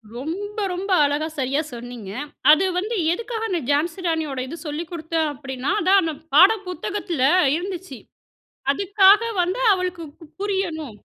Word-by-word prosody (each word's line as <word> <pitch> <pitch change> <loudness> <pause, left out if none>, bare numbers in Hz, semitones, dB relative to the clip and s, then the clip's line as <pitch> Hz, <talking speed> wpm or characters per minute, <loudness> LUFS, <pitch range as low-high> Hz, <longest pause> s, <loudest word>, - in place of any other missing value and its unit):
ரொம்ப, 380 - -5 0.2
ரொம்ப 380 +3 -5
அழகா, 290 +2 0
சரியா 270 +3 0
சொன்னீங்க. 240 -4 -8 0.4
அது 315 +5 +5
வந்து 425 +6 -2 0.2
எதுக்காக 450 +3 -3
அந்த 355 -4 -1
ஜான்சி 320 +5 0
ராணியோட 315 -5 -1
இது 330 +6 -7
சொல்லிக் 310 +3 -5
குடுத்தேன். 320 -1 -1
அப்டின்னா, 265 +1 -4
அதான் 385 +3 +5
அந்த 320 - -2 0.2
பாட 370 +7 +9 0.2
புத்தகத்தில 360 -4 -4 0.3
இருந்துச்சு. 355 - -6 0.7
அதுக்காக 395 +4 +5 0.2
வந்து 365 +7 -2
அவளுக்கு 365 -2 -2 0.2
கு - - -12 0.2
புரியணும். 340 - -3
335 Hz, 135 wpm, -22 LUFS, 290-385 Hz, 0.7 s, பாட